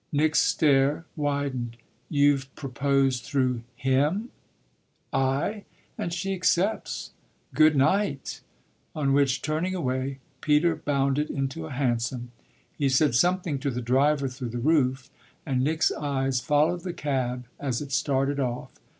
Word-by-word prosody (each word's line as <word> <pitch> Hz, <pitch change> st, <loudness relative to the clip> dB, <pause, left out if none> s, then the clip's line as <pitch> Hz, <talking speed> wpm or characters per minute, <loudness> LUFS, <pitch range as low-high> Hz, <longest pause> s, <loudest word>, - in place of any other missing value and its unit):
'" -, -, -44 dB
Nick's 155 Hz, +1 st, +3 dB
stare 145 Hz, +1 st, +3 dB
widened. 140 Hz, -5 st, -2 dB, 0.3 s
"You've 145 Hz, -3 st, +3 dB
proposed 135 Hz, -1 st, 0 dB
through 130 Hz, -4 st, 0 dB
him?" 140 Hz, -, +1 dB, 0.8 s
"Aye, 140 Hz, +11 st, 0 dB, 0.3 s
and 170 Hz, -, -3 dB
she 180 Hz, +3 st, -2 dB
accepts. 190 Hz, +3 st, 0 dB, 0.4 s
Good 155 Hz, -1 st, +5 dB
night!" 145 Hz, +1 st, +1 dB, 0.5 s
on 140 Hz, -3 st, +1 dB
which, 135 Hz, -2 st, +2 dB
turning 160 Hz, +5 st, -1 dB
away, 130 Hz, -4 st, -2 dB, 0.2 s
Peter 155 Hz, +3 st, +3 dB
bounded 140 Hz, +1 st, 0 dB
into 135 Hz, -, -3 dB
a -, -, -9 dB
hansom. 120 Hz, -2 st, -1 dB, 0.4 s
He 140 Hz, -3 st, +1 dB
said 135 Hz, +1 st, +3 dB
something 175 Hz, +1 st, +2 dB
to 140 Hz, +1 st, -1 dB
the 125 Hz, -2 st, -3 dB
driver 135 Hz, +4 st, +2 dB
through 125 Hz, -1 st, -5 dB
the 120 Hz, -, -5 dB
roof, 130 Hz, -1 st, +1 dB, 0.3 s
and 130 Hz, -3 st, 0 dB
Nick's 155 Hz, +3 st, +2 dB
eyes 135 Hz, -3 st, -1 dB
followed 155 Hz, +3 st, +2 dB
the 180 Hz, -1 st, -4 dB
cab 125 Hz, -5 st, -2 dB
as 130 Hz, -4 st, -1 dB
it 145 Hz, -2 st, -7 dB
started 135 Hz, +2 st, +1 dB
off. 125 Hz, -2 st, -3 dB
140 Hz, 135 wpm, -26 LUFS, 130-155 Hz, 0.8 s, Good